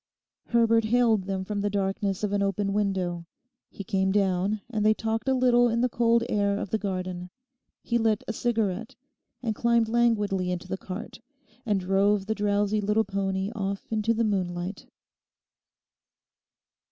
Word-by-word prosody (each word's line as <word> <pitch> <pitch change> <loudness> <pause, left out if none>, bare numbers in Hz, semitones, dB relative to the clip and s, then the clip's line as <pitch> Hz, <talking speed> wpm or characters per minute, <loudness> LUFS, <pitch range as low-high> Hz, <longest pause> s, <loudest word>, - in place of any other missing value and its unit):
Herbert 230 -1 +3
hailed 225 -3 +3
them 190 -1 -3
from 205 0 -3
the 205 - 0
darkness 195 0 -1
of 210 - 0
an 200 - +1
open 195 0 0
window. 185 -4 -1 0.4
He 200 - -8
came 190 0 0
down, 195 +1 +1
and 220 -4 -2
they 215 0 +4
talked 225 +2 -2
a 265 - +3
little 245 -1 +4
in 230 +1 0
the 250 - +2
cold 235 0 +2
air 200 -3 +1
of 200 - -5
the 220 - +1
garden. 185 -2 -4 0.5
He 235 0 0
lit 220 -2 +1
a - - -2
cigarette, 225 -3 -1 0.5
and 225 -3 0
climbed 235 +1 +2
languidly 210 -6 +1
into 180 0 -4
the 190 - -2
cart, 190 +4 -7 0.5
and 205 -2 +2
drove 195 +2 +2
the 220 - 0
drowsy 205 0 +1
little 210 +2 +2
pony 195 0 -2
off 195 -1 -3
into 220 +1 +1
the 230 - +1
moonlight. 185 -2 -2
205 Hz, 160 wpm, -27 LUFS, 195-225 Hz, 0.5 s, they